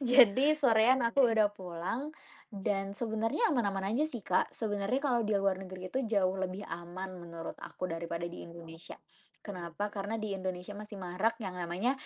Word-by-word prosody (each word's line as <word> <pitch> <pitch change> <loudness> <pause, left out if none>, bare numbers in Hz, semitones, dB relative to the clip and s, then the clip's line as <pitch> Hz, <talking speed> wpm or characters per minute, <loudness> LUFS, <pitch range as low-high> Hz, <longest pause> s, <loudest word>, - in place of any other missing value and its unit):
Jadi 260 +3 +6
sorean 250 -2 +5
aku 235 +4 +3
udah 215 -2 +4
pulang, 185 - -4 0.4
dan 195 -1 -2
sebenarnya 225 - +1
aman-aman 200 -5 0
aja 265 - +2
sih, 240 -8 -7
Kak. 185 - +2
Sebenarnya 205 +2 -1
kalau 245 -4 +3
di 215 -1 +2
luar 195 -1 +1
negeri 185 -1 -7
itu 265 - +1
jauh 195 -4 +3
lebih 190 +1 -3
aman 175 +3 -6
menurut 170 -1 -6
aku 185 - -4
daripada 170 0 -3
di 175 - -7
Indonesia. 165 -1 -10 0.5
Kenapa? 180 0 -4
Karena 205 +2 -2
di 215 -2 -2
Indonesia 185 0 -4
masih 210 0 -8
marak 190 +6 0
yang 185 -2 -4
namanya 180 +8 0
200 Hz, 165 wpm, -32 LUFS, 180-225 Hz, 0.5 s, Jadi